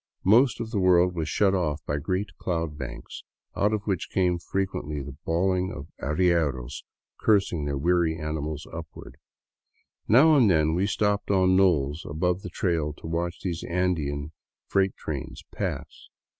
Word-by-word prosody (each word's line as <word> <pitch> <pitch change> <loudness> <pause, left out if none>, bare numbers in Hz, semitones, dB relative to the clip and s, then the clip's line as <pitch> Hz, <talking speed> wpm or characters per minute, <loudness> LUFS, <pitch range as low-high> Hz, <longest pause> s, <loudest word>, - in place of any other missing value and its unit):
Most 120 +7 +5
of 115 -1 -5
the 105 - 0
world 90 -1 +4
was 80 -2 -3
shut 100 +5 +2
off 75 -5 -1
by 75 - -1
great 90 +4 -3
cloud 85 -4 -2
banks, - - -8 0.3
out 105 +1 +2
of 105 -2 -1
which 95 -4 -2
came 90 -2 +1
frequently 90 -6 -3
the 70 0 -8
bawling 90 +2 +1
of 75 - -8
arrieros 75 -5 0 0.4
cursing 100 -8 +2
their 70 -1 -2
weary 85 +1 +2
animals 75 -1 -4
upward. 85 -1 -9 0.9
Now 150 +8 +6
and 125 -7 +5
then 80 -3 +3
we 95 +4 +1
stopped 105 0 0
on 95 -2 +4
knolls 80 -6 +2
above 90 +5 0
the 90 - -7
trail 85 -4 -1
to - - -14
watch 85 +1 -3
these 85 -3 -3
Andean 80 -5 -1 0.3
freight 95 -1 +1
trains 70 -5 -6
pass. - - -5
85 Hz, 155 wpm, -26 LUFS, 75-95 Hz, 0.9 s, Now